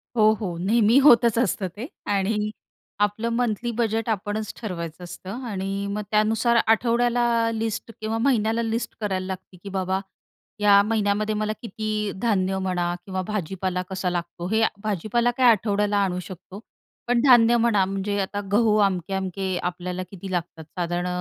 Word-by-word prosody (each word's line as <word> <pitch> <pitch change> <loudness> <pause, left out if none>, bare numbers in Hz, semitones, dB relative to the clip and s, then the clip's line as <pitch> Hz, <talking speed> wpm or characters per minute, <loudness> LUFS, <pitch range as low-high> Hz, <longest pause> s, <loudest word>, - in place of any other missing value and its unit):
हो, 215 -2 +5
हो, 180 -5 -4
नेहमी 215 +6 +3
होतच 235 -4 +6
असतं 230 -5 +1
ते 235 +5 -5 0.2
आणि 210 +2 0 0.5
आपलं 205 +3 0
मंथली 235 0 -1
बजेट 225 -1 0
आपणच 210 0 -2
ठरवायचं 170 -5 -5
असतं 190 +7 -7
आणि 195 -1 -3
मग 205 +1 -2
त्यानुसार 220 +2 +2
आठवड्याला 240 +2 +2 0.3
लिस्ट 225 0 -3
किंवा 220 +1 -1
महिन्याला 230 -2 +2
लिस्ट 225 +1 -2
करायला 190 -3 -1
लागते, 185 0 -7
की 200 - -6
बाबा, 190 0 -1 0.6
या 205 -1 +6
महिन्यामध्ये 215 0 0
मला 215 0 -1
किती 215 -2 -3
धान्य 195 -5 +1
म्हणा 175 -2 -1
किंवा 190 -2 -3
भाजीपाला 190 -2 -2
कसा 190 -1 -2
लागतो. 175 0 -4
हे 220 0 +3 0.2
भाजीपाला 215 +4 0
काही 245 0 +4
आठवड्याला 205 -1 +2
आणू 180 -2 -1
शकतो, 185 +1 -10 0.5
पण 240 -1 +3
धान्य 240 -2 +6
म्हणा, 225 -4 +3
म्हणजे 195 +1 -2
आता 200 +1 -3
गहू 215 0 +4
अमके-अमके 190 0 -2
आपल्याला 180 +1 -3
किती 195 0 -8
लागतात 170 -2 -3 0.2
साधारण 175 +1 -1
205 Hz, 145 wpm, -24 LUFS, 190-225 Hz, 0.6 s, होतच